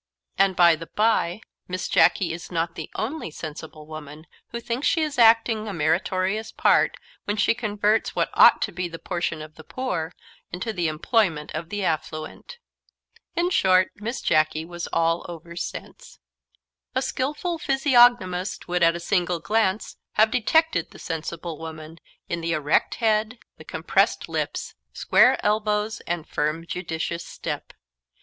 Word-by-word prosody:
And, 195 Hz, -1 st, +3 dB
by 170 Hz, -2 st, +6 dB
the 165 Hz, +1 st, -9 dB
bye, 215 Hz, -3 st, +1 dB, 0.3 s
Miss 185 Hz, 0 st, -3 dB
Jacky 170 Hz, -4 st, +3 dB
is 170 Hz, +2 st, -8 dB
not 165 Hz, 0 st, -1 dB
the 160 Hz, -, -7 dB
only 270 Hz, -, -3 dB
sensible 155 Hz, 0 st, -8 dB
woman 155 Hz, 0 st, -9 dB, 0.2 s
who 235 Hz, -, -5 dB
thinks 235 Hz, +4 st, -2 dB
she 325 Hz, -, +2 dB
is 300 Hz, -5 st, -3 dB
acting 225 Hz, -1 st, +5 dB
a 205 Hz, -, -4 dB
meritorious 185 Hz, +6 st, 0 dB
part -, -, +3 dB, 0.3 s
when 205 Hz, +1 st, -1 dB
she 210 Hz, -, +3 dB
converts 215 Hz, -2 st, 0 dB
what -, -, 0 dB
ought -, -, +7 dB
to 210 Hz, -, -2 dB
be 180 Hz, -1 st, -3 dB
the 165 Hz, -1 st, -8 dB
portion 170 Hz, -3 st, -3 dB
of 155 Hz, 0 st, -12 dB
the 160 Hz, -, -11 dB
poor 175 Hz, -8 st, -3 dB, 0.4 s
into 220 Hz, +6 st, -3 dB
the 175 Hz, -4 st, 0 dB
employment 155 Hz, 0 st, 0 dB
of 160 Hz, +1 st, -5 dB
the 205 Hz, 0 st, -3 dB
affluent. 155 Hz, -, -4 dB, 0.8 s
In 350 Hz, +1 st, +1 dB
short, 185 Hz, -, +4 dB
Miss 225 Hz, +5 st, -4 dB
Jacky 155 Hz, 0 st, +2 dB
was 175 Hz, 0 st, -6 dB
all 165 Hz, +1 st, +1 dB
over 170 Hz, 0 st, -9 dB
sense. 175 Hz, -, -7 dB, 0.8 s
A 260 Hz, -, +2 dB
skilful 300 Hz, +7 st, -2 dB
physiognomist 245 Hz, -, +3 dB
would, 180 Hz, 0 st, 0 dB
at 165 Hz, 0 st, +5 dB
a -, -, -4 dB
single 175 Hz, -1 st, 0 dB
glance, 210 Hz, +2 st, 0 dB, 0.2 s
have 215 Hz, +1 st, +4 dB
detected 250 Hz, -, +2 dB
the -, -, -14 dB
sensible 165 Hz, 0 st, -5 dB
woman, 160 Hz, 0 st, -9 dB, 0.3 s
in 170 Hz, -1 st, -3 dB
the 165 Hz, 0 st, -1 dB
erect 150 Hz, -2 st, +1 dB
head, 220 Hz, 0 st, +1 dB, 0.2 s
the -, -, -10 dB
compressed -, -, 0 dB
lips, -, -, -3 dB, 0.2 s
square -, -, +4 dB
elbows, 210 Hz, 0 st, +1 dB
and 170 Hz, -2 st, -3 dB
firm 155 Hz, +2 st, -1 dB
judicious 170 Hz, -1 st, -4 dB
step. -, -, -6 dB
180 Hz, 155 wpm, -24 LUFS, 165-220 Hz, 0.8 s, ought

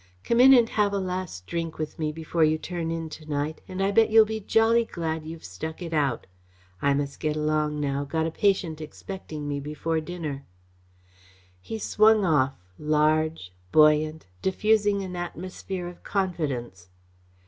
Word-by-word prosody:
Come 235 Hz, -, +1 dB
in 260 Hz, +2 st, +9 dB
and 240 Hz, -3 st, +7 dB
have 210 Hz, -2 st, +1 dB
a -, -, +1 dB
last 185 Hz, -, -4 dB
drink 165 Hz, -, -4 dB
with 155 Hz, 0 st, -5 dB
me 155 Hz, -1 st, 0 dB
before 160 Hz, +1 st, -1 dB
you 155 Hz, 0 st, +3 dB
turn 170 Hz, 0 st, -4 dB
in 165 Hz, -1 st, -3 dB
to 155 Hz, -, -10 dB
night 150 Hz, +1 st, -2 dB
and 185 Hz, +1 st, -3 dB
I 195 Hz, -, +2 dB
bet 225 Hz, +2 st, +4 dB
you'll 220 Hz, 0 st, +7 dB
be 220 Hz, +1 st, -4 dB
jolly 225 Hz, +3 st, +3 dB
glad 160 Hz, -6 st, -4 dB
you've 165 Hz, 0 st, -8 dB
stuck 100 Hz, -, -6 dB
it 170 Hz, -2 st, -6 dB
out. 140 Hz, -6 st, 0 dB, 0.6 s
I 140 Hz, 0 st, +3 dB
must 140 Hz, 0 st, -3 dB
get 155 Hz, -1 st, -1 dB
along 150 Hz, 0 st, 0 dB
now. 140 Hz, -1 st, -1 dB
Got 160 Hz, +3 st, -1 dB
a 165 Hz, -, -2 dB
patient 170 Hz, -4 st, 0 dB
expecting 155 Hz, -2 st, -7 dB
me 145 Hz, -1 st, -2 dB
before 150 Hz, +3 st, -2 dB
dinner." 155 Hz, -4 st, -5 dB, 1.2 s
He 220 Hz, -, -5 dB
swung 215 Hz, -1 st, +4 dB
off, 140 Hz, -5 st, +2 dB, 0.2 s
large, 155 Hz, -, +1 dB, 0.2 s
buoyant, 155 Hz, 0 st, +4 dB, 0.2 s
diffusing 205 Hz, +1 st, +2 dB
an 185 Hz, -1 st, -6 dB
atmosphere 180 Hz, +1 st, -5 dB
of 175 Hz, 0 st, -10 dB
confidence. 140 Hz, -, -3 dB
160 Hz, 165 wpm, -26 LUFS, 150-190 Hz, 1.2 s, in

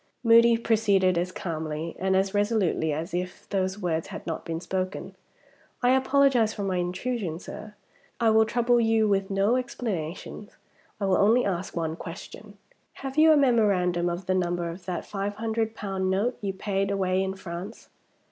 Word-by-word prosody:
Moody 230 Hz, 0 st, +6 dB
proceeded 205 Hz, -5 st, +2 dB
as 175 Hz, +1 st, -1 dB
calmly 160 Hz, -2 st, -4 dB
and 190 Hz, 0 st, +1 dB
as 190 Hz, +1 st, +1 dB
resolutely 205 Hz, -6 st, +1 dB
as 160 Hz, +5 st, -4 dB
if 180 Hz, +1 st, -4 dB
those 190 Hz, -1 st, -1 dB
words 165 Hz, -5 st, -2 dB
had -, -, -8 dB
not 165 Hz, -2 st, -4 dB
been 165 Hz, -1 st, -4 dB
spoken. 185 Hz, +2 st, -4 dB, 0.7 s
"I 245 Hz, -, +5 dB
apologize 265 Hz, -4 st, +3 dB
for 205 Hz, -, -4 dB
my 190 Hz, -2 st, -1 dB
intrusion, 180 Hz, 0 st, -2 dB
sir. 210 Hz, +4 st, -9 dB, 0.4 s
I 230 Hz, -2 st, +4 dB
will 220 Hz, 0 st, +5 dB
trouble 240 Hz, +1 st, +2 dB
you 225 Hz, -1 st, +3 dB
with 195 Hz, -1 st, +1 dB
no 200 Hz, +5 st, +2 dB
explanations. 205 Hz, -, -5 dB, 0.4 s
I 200 Hz, -, -1 dB
will 190 Hz, -1 st, +3 dB
only 225 Hz, +5 st, +4 dB
ask 185 Hz, -2 st, -3 dB
one 160 Hz, -2 st, -2 dB
question. 200 Hz, +4 st, -10 dB, 0.4 s
Have 270 Hz, -1 st, -7 dB
you 315 Hz, +1 st, +6 dB
a 310 Hz, -, +6 dB
memorandum 195 Hz, -10 st, +2 dB
of 175 Hz, +2 st, -4 dB
the 185 Hz, -, +1 dB
number 175 Hz, -2 st, -1 dB
of 175 Hz, +2 st, -11 dB
that 180 Hz, -2 st, -4 dB
five 200 Hz, 0 st, -4 dB
hundred 225 Hz, 0 st, -2 dB
pound 190 Hz, -2 st, -2 dB
note 205 Hz, +7 st, 0 dB
you 200 Hz, -2 st, -1 dB
paid 195 Hz, 0 st, -1 dB
away 190 Hz, -1 st, +1 dB
in 190 Hz, 0 st, -2 dB
France?" 190 Hz, +3 st, -8 dB
195 Hz, 170 wpm, -26 LUFS, 180-225 Hz, 0.7 s, Moody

